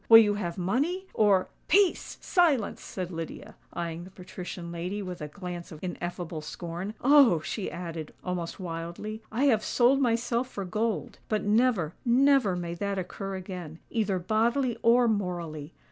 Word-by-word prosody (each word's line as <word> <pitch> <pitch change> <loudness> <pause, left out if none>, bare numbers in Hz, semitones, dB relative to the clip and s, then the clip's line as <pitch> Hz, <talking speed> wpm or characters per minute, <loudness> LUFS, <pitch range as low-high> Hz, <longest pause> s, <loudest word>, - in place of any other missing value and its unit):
Will 225 - +12
you 210 -2 +6
have 185 -4 -3
money? 280 - 0
or——" 200 -4 +4 0.2
"Peace!—silence!" 350 - +2
said 185 -1 -5
Lydia, 165 -1 -7 0.2
eyeing 170 0 -4
the 185 - -10
patrician 180 -2 -8
lady 180 +4 -3
with 180 -2 -6
a 150 - -3
glance 175 +1 -7
of 160 - -8
ineffable 175 -2 -4
scorn. 175 +6 -6
"Oh!" 270 - +6
she 195 +5 -3
added, 165 -3 -6
almost 180 -1 -3
wildly, 175 +5 -5
"I 235 +5 0
have 225 -7 +4
sold 260 +3 +3
myself 240 0 +1
for 200 -6 -5
gold;—but 215 +1 -2
never—never 235 - +3
may 175 -1 -3
that 200 +3 -2
occur 195 +1 -4
again; 180 -4 -7
either 210 -4 +1
bodily 230 +7 +1
or 240 +1 +5
morally! 175 -7 -2
195 Hz, 145 wpm, -28 LUFS, 175-230 Hz, 0.2 s, Will